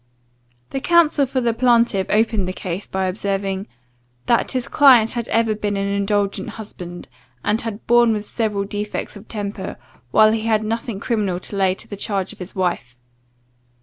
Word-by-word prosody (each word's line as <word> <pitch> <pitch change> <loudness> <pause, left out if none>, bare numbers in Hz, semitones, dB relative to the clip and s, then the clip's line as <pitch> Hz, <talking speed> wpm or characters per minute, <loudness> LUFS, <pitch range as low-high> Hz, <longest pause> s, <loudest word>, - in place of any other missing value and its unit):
The 270 - -2
counsel 315 -3 +4
for 260 0 -1
the 235 -1 +1
plaintiff 235 -5 +3
opened 215 -3 +2
the 185 - -3
cause, 185 +1 -5
by 190 0 -1
observing, 195 0 -2 0.6
"that 235 +3 +2
his 255 -2 -1
client 250 -6 +6
had 235 -2 -3
ever 225 -1 +2
been 205 -1 -2
an 195 0 -1
indulgent 200 +1 0
husband, 185 -5 -9 0.4
and 215 +2 +1
had 225 -2 -6
borne 240 -1 +5
with 210 -1 -2
several 210 -4 -1
defects 205 +2 -4
of 205 +1 -12
temper, 200 -2 -5 0.3
while 215 - +6
he 220 0 -1
had 220 -1 +2
nothing 225 -1 -3
criminal 205 -6 -1
to 205 - -4
lay 190 -1 +2
to - - -7
the 205 - -6
charge 195 -2 -2
of - - -18
his 180 +2 -8
wife. 175 -10 -2
210 Hz, 175 wpm, -21 LUFS, 195-230 Hz, 0.6 s, client